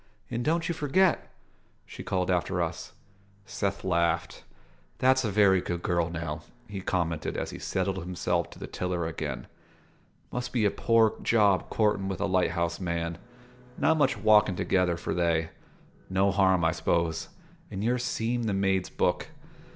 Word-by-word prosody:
"And 120 - -2
don't 165 +4 +1
you 170 - 0
forget!" 165 +4 +2 0.6
she - - -9
called 90 -1 -1
after 90 +1 0
us. 85 0 -3 0.5
Seth 100 -1 -3
laughed. 85 -2 0 0.5
"That's 130 +1 +3
a 110 - 0
very 100 -2 +4
good 85 -1 -4
girl, 85 -2 +1
now," 80 -2 -4 0.3
he 100 -2 -6
commented 85 -4 -1
as - - -3
he - - -8
settled 95 0 -1
himself 90 -1 -1
to - - -13
the - - -6
tiller 90 -2 -2
again. 80 -2 -4 0.9
"Must 125 0 -3
be 115 -4 +2
a 100 - +3
poor 115 -1 +3
job 105 -5 +3
courtin' 105 -3 +1
with 95 -2 -3
a 100 - 0
light 95 -2 +2
house 85 -1 -1
man: 85 -2 -3 0.6
not 160 - +3
much 145 -4 +2
walkin' 105 -3 +4
together 90 -1 +1
for - - -3
they. 85 -2 +1 0.6
No 95 +1 +2
harm, 95 -3 +3
I 80 - +4
s'pose, 85 -1 -1 0.4
in 95 - -4
your 125 +2 +1
seem' 120 -1 -1
the 105 -3 0
maid's 95 -1 +1
book." - - 0
95 Hz, 160 wpm, -28 LUFS, 85-110 Hz, 0.9 s, very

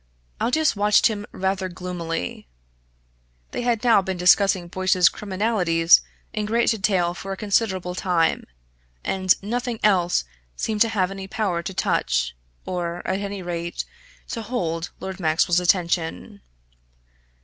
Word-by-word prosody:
Aldous 310 +3 +2
watched 205 +1 +4
him 210 -1 -5
rather 190 0 -1
gloomily. 175 - -5 1.0
They - - -3
had 240 -2 0
now 230 -5 +5
been 190 -1 -4
discussing 185 0 +4
Boyce's 185 0 +3
criminalities 185 -5 +3 0.3
in 215 -1 -2
great 230 +2 +2
detail 190 -5 +1
for 195 +2 -7
a 195 - -4
considerable 195 -4 0
time, 180 -3 +1 0.6
and 185 -1 +2
nothing 240 +2 -2
else 180 - +3 0.3
seemed 215 - -2
to 230 - +5
have 195 -4 0
any 195 -1 -7
power 190 -4 -1
to 190 - -6
touch - - 0 0.3
or, 175 -1 -4
at 190 +1 0
any 200 -1 -5
rate, 170 -1 -4 0.4
to 230 - -4
hold 175 -8 -3
Lord 190 0 -6
Maxwell's 170 +1 +2
attention. 180 +3 0
190 Hz, 130 wpm, -23 LUFS, 175-210 Hz, 1.0 s, now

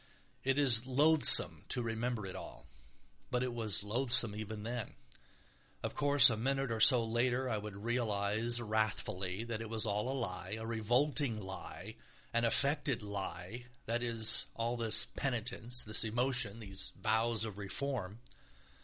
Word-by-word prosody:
It 135 +1 -2
is 130 -4 +3
loathsome 150 +4 +7
to 125 - 0
remember 115 -1 -5
it 95 - -9
all, 60 -1 -12 0.6
but 125 0 -3
it 125 -1 -5
was 110 -5 -2
loathsome 120 0 +2
even 110 0 -8
then. 120 0 -7 0.9
Of - - -5
course, 140 -3 +6
a 110 - -4
minute 135 +2 -3
or 115 - -4
so 120 +1 +7
later 120 +3 -2
I 110 -4 -4
would 105 -1 -10
realise 110 +1 -3
wrathfully 105 -3 -4
that 115 -1 -7
it 115 - -9
was 110 -1 -3
all 105 +4 -3
a 135 - -5
lie, 95 -2 -7
a 110 - -8
revolting 120 +3 -1
lie, 95 +2 -11 0.4
an 115 0 -1
affected 140 +1 -1
lie, 100 +2 -8 0.2
that 115 +1 -4
is, 115 -2 +6
all 115 +1 -4
this 110 -2 +3
penitence, 125 -1 -2
this 110 +1 +3
emotion, 115 -1 -3
these 95 -2 -9
vows 110 0 -2
of 105 -2 -10
reform. 110 0 -3
115 Hz, 150 wpm, -31 LUFS, 105-125 Hz, 0.9 s, loathsome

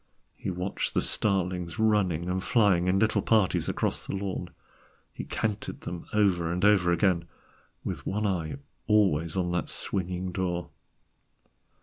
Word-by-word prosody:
He - - -5
watched 90 +1 -2
the - - +3
starlings 90 -4 0
running 100 -7 +2
and 95 +1 -1
flying 100 -7 +3
in 95 +1 +3
little 110 +2 +2
parties 110 -5 +2
across - - -1
the - - -3
lawn; 95 -2 -3 0.6
he - - -6
counted 110 -2 -3
them 85 -1 -6
over 90 -6 +2
and 90 +3 0
over 95 -4 +5
again, 85 -1 +2 0.6
with - - -4
one 105 +2 -1
eye 90 -3 -1 0.3
always 95 -6 +3
on 90 -1 0
that 90 - -1
swinging 90 0 -2
door. 90 -2 -2
90 Hz, 140 wpm, -28 LUFS, 85-100 Hz, 0.6 s, over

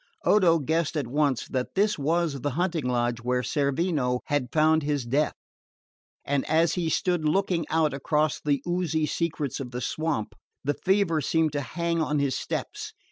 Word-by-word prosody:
Odo 180 -5 +5
guessed 160 +2 0
at 145 - -1
once 140 0 0
that 130 -1 -3
this 205 -2 +2
was 155 -1 0
the 145 - 0
hunting 175 -5 0
lodge 120 -1 0
where 125 +1 0
Cerveno 140 -3 0
had 140 -4 -1
found 155 0 +4
his 145 -3 -1
death; 140 +6 +1 0.9
and 140 -1 0
as 165 +1 +3
he 170 -3 -1
stood 175 -1 0
looking 165 0 +1
out 160 -2 +2
across 150 +2 0
the 140 -2 0
oozy 175 -3 0
secrets 155 -4 -2
of 130 -3 -5
the 125 0 -3
marsh, 155 -9 0 0.4
the 145 +1 +1
fever 190 -3 +1
seemed 160 +2 +1
to 145 0 -2
hang 170 +3 -1
on 150 -1 0
his 140 -2 +1
steps. - - -4
150 Hz, 170 wpm, -26 LUFS, 140-165 Hz, 0.9 s, Odo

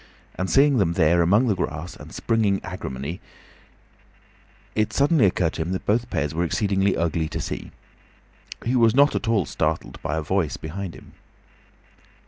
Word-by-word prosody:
And 95 +1 -3
seeing 140 -2 +4
them 85 -4 +2
there 85 -1 +3
among 100 +9 +4
the 110 - +2
grass 85 -2 -4
and - - -12
springing 110 -4 +1
agrimony, 80 -3 -6 1.5
it 110 0 0
suddenly 140 -4 +4
occurred 90 -3 0
to - - -4
him 85 +3 -2
that 95 - -4
both 120 +3 +1
pairs 75 +2 -1
were 85 +2 0
exceedingly 95 +2 +1
ugly 80 -1 0
to - - -4
see. - - -5 1.0
He 125 +3 +1
was 115 -2 +4
not 145 +2 +5
at - - -2
all 110 -6 +2
startled 80 +3 -2
by 75 - -2
a 80 - -2
voice 85 -1 -1
behind 90 +3 -6
him. - - -14
95 Hz, 165 wpm, -24 LUFS, 80-110 Hz, 1.5 s, not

